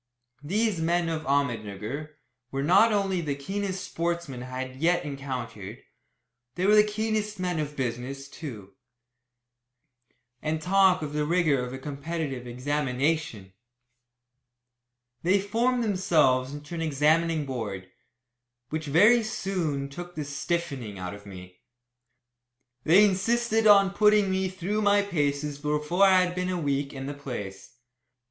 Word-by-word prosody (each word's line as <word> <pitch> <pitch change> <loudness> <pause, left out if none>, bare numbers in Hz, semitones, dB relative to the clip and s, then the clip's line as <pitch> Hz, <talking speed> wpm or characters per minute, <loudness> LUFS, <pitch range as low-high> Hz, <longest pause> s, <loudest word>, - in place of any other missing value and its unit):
These 200 +3 0
men 170 +1 +1
of 155 -1 -4
Ahmednugger 130 +1 -2 0.3
were 135 +1 -3
not 185 +9 +5
only 195 -3 0
the 145 -4 -2
keenest 190 +6 -4
sportsmen 170 -7 -3
I 130 +1 -4
had 160 +7 0
encountered, 125 -7 -6 0.8
they 180 - -1
were 205 - +5
the 210 0 +7
keenest 215 -1 -2
men 180 -3 -1
of 150 -1 -4
business, 130 +2 -4
too. 110 - -9 1.7
And 155 +1 -1
talk 185 0 +3
of 150 -1 -5
the 150 0 0
rigour 155 -5 +2
of 125 - -5
a 130 - -5
competitive 140 -2 -5
examination! 135 -4 -2 1.7
They 185 +4 +3
formed 235 +5 0
themselves 155 - +2
into 145 +2 -9
an 165 - -3
examining 155 +1 +2
board, 105 -8 -5 0.8
which 155 0 -4
very 205 +11 +5
soon 180 -10 -2
took 175 +5 -9
the 150 - -4
"stiffening" 140 - -3
out 90 0 -5
of 100 0 -12
me. 90 -2 -12 1.2
They 190 +6 +7
insisted 225 +3 +1
on 200 -2 +6
putting 210 -1 +4
me 190 0 0
through 190 +3 -2
my 205 -1 +4
paces 145 -5 -1
before 150 +5 +1
I 190 -1 +6
had 180 0 -2
been 180 0 -2
a 185 - -1
week 140 -2 -1
in 135 -1 -7
the 145 - -4
place. 105 -10 -7
155 Hz, 135 wpm, -27 LUFS, 135-190 Hz, 1.7 s, the